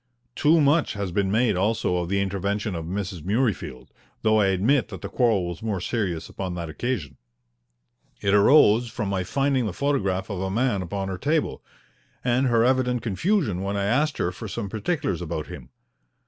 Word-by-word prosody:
Too 160 +2 +4
much 145 +2 +3
has 100 -3 -3
been 95 +1 0
made 110 0 +2
also 95 -1 +1
of 85 -1 -2
the 100 0 +1
intervention 100 +2 -2
of 85 -2 -4
Mrs. 95 -1 -4
Murreyfield, 100 - -1 0.3
though 110 0 +4
I 100 - +4
admit 110 +8 +2
that 95 -5 -9
the - - -4
quarrel 110 -8 +2
was 85 -1 -6
more 110 -4 -2
serious 90 -5 -2
upon 95 -2 -5
that 85 -2 -5
occasion. 80 - -3 1.0
It 100 0 +1
arose 110 +1 +6
from 105 -2 -3
my 95 -2 -1
finding 135 +3 0
the 100 - -4
photograph 100 -7 -1
of 95 -2 -3
a 95 - -2
man 110 -1 0
upon 95 +2 -4
her 95 -2 -4
table, 155 - 0 0.6
and 125 +2 +2
her 115 -2 +3
evident 125 -2 +1
confusion 120 - 0
when 100 +1 -2
I 100 - 0
asked 140 +8 +1
her 85 - 0
for 100 +5 -8
some 105 0 -4
particulars 110 - -2
about 80 -2 -4
him. - - -10
100 Hz, 185 wpm, -24 LUFS, 95-125 Hz, 1.0 s, arose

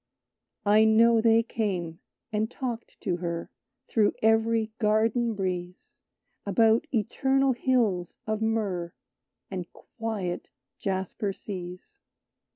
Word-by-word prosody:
"I 210 +2 +6
know 225 +1 +5
they 225 0 +5
came, 185 -8 -3 0.3
and 215 +1 0
talked 245 -2 -5
to 180 -4 -1
her, 170 -1 -4 0.4
Through 215 -3 +2
every 225 0 +3
garden 225 +1 +2
breeze, 180 -2 -5 0.4
About 225 +7 +3
eternal 265 +4 +2
Hills 230 -9 0
of 215 0 -2
Myrrh, 200 -6 -1 0.6
And 180 -3 -5
quiet 215 -6 -5 0.3
Jasper 195 +1 -2
Seas. 180 -3 -8
215 Hz, 100 wpm, -27 LUFS, 185-230 Hz, 0.6 s, I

